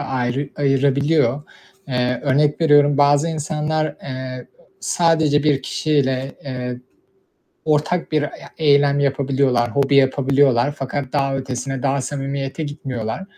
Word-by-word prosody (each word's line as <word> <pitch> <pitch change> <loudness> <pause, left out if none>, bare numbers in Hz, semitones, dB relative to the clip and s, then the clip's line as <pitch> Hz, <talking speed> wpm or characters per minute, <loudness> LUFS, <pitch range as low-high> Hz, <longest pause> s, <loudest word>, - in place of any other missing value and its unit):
ayrı 130 +2 -2
ayırabiliyor. 140 0 +1 0.5
Eee, 125 -1 -1
örnek 145 +2 +2
veriyorum, 145 -3 +4
bazı 145 +2 +4
insanlar, 155 -1 -2
eee, 130 -1 -6 0.3
sadece 160 -4 +2
1 145 -3 +1
kişiyle, 135 -3 -1
eee, 125 -2 -5 0.9
ortak 155 +3 0
bir 155 -1 +2
ya 145 - -7
eylem 145 -2 +3
yapabiliyorlar, 135 -4 +1
hobi 140 0 +2
yapabiliyorlar 135 -1 +3
fakat 135 0 -4
daha 135 -2 0
ötesine, 135 0 -4
daha 140 0 +1
samimiyete 140 +2 -4
gitmiyorlar. 135 -3 -5
140 Hz, 110 wpm, -20 LUFS, 130-145 Hz, 0.9 s, veriyorum